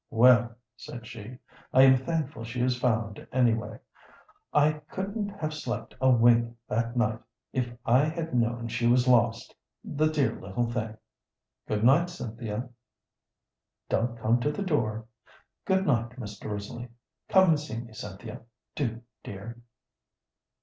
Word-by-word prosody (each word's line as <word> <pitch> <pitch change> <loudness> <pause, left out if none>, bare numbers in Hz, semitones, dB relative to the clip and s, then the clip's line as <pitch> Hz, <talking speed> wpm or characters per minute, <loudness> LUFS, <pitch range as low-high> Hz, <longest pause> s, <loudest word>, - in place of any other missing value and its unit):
"Well," 120 0 +5 0.2
said 120 -2 -9
she, 115 +2 -9 0.3
"I 130 - +7
am 130 0 +8
thankful 140 -2 -2
she 120 +2 -5
is 125 0 +2
found, 115 -4 -1
anyway; 120 -3 +1 0.7
I 150 +1 +3
couldn't 200 +2 -3
have 160 -7 -4
slept 120 -6 -4
a 130 - +5
wink 120 -1 +4
that 115 +2 -1
night 110 -2 +1 0.3
if 125 -2 -1
I 130 +4 +5
had 165 0 -3
known 120 -1 0
she 120 +1 0
was 125 +1 +4
lost, 120 -2 +3 0.3
the 155 +1 +1
dear 145 -7 0
little 100 +5 -1
thing. 110 -2 -3 0.7
Good 105 0 -1
night, 150 +9 +5
Cynthia; 115 -6 -5 1.2
don't 115 +1 0
come 115 +2 +2
to 145 +5 0
the 200 - -3
door. 115 - -1 0.6
Good 190 0 +2
night, 120 -7 +2
Mr. 105 -2 -7
Risley. 105 +4 -5 0.4
Come 190 -1 +6
and 155 -2 +4
see 145 -6 -6
me, 115 -1 -10
Cynthia 105 +1 -8 0.3
do, 115 -5 -3 0.2
dear." 115 +5 -8
120 Hz, 140 wpm, -28 LUFS, 115-140 Hz, 1.2 s, am